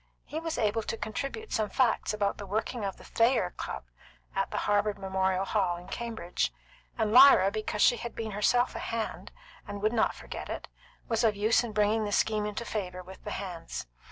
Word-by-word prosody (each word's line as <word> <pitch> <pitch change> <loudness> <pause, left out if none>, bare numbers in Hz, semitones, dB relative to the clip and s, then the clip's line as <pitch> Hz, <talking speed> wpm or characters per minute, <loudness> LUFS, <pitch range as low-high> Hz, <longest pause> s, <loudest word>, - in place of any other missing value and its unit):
He 310 - -4
was 325 -1 -3
able 220 0 +1
to 225 - -4
contribute 275 - -4
some 215 -2 +1
facts 255 -3 +2
about 205 -1 -1
the 200 - -6
working 220 +3 -2
of 195 -1 -3
the - - -14
Thayer 230 -6 +2
Club - - -5 0.5
at - - 0
the - - -3
Harvard 205 0 +2
Memorial 190 -1 0
Hall 190 -4 +1
in 175 - -11
Cambridge, 225 -7 -2 0.5
and 220 -2 +1
Lyra 245 -6 +8
because 215 0 -1
she 240 - +5
had 235 - -6
been 220 -1 -4
herself 245 +5 +2
a - - -5
hand, 230 -1 -4 0.4
and 205 0 -5
would 215 +2 +2
not 225 - +2
forget - - -7
it, - - -5 0.4
was 225 -1 +1
of 220 -2 +3
use 215 +4 +3
in 235 - -4
bringing 210 +1 +2
the 205 - -3
scheme 210 0 +2
into 210 +3 -4
favour 185 -5 -4
with 190 +1 -12
the - - -5
hands. 180 -5 -5
210 Hz, 200 wpm, -29 LUFS, 200-230 Hz, 0.5 s, Lyra